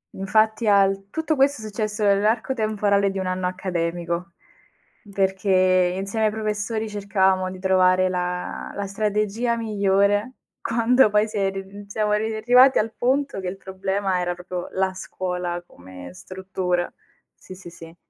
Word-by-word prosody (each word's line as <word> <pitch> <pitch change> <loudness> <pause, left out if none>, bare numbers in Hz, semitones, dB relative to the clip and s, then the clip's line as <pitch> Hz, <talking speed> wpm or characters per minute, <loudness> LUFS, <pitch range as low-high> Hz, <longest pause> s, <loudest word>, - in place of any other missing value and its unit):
Infatti 215 +3 +1
al 195 -1 +3
tutto 320 +5 -1
questo 275 -3 +2
è - - -7
successo 215 0 -3
nell'arco 210 +5 +2
temporale 210 -3 +1
di 195 - -5
1 190 - -2
anno 185 0 -1
accademico, 170 -1 -3 0.8
perché 185 -2 +2
insieme 200 +3 -1
ai - - 0
professori 215 +1 -2
cercavamo 190 -2 +1
di 185 - -8
trovare 185 0 +3
la 180 0 -3
la 200 - -3
strategia 215 +3 -1
migliore, 205 +1 +1 0.3
quando 235 +1 +3
poi 210 +1 +2
si 215 0 -6
è 195 -1 +1
ri 195 0 -5
mhmm, 200 +1 -12
siamo 210 +1 -1
arri 220 +1 0
arrivati 250 +4 +5
al 220 +1 0
punto 270 -1 0
che 190 - -5
il 185 +2 -5
problema 190 0 -2
era 175 0 -2
proprio 180 0 -6
la 190 0 0
scuola 180 -2 -4
come 90 - -12
struttura. 185 - -3 0.4
Sì, 185 - -12
sì, 180 -2 -11
sì. 165 -1 -13
195 Hz, 155 wpm, -23 LUFS, 185-215 Hz, 0.8 s, arrivati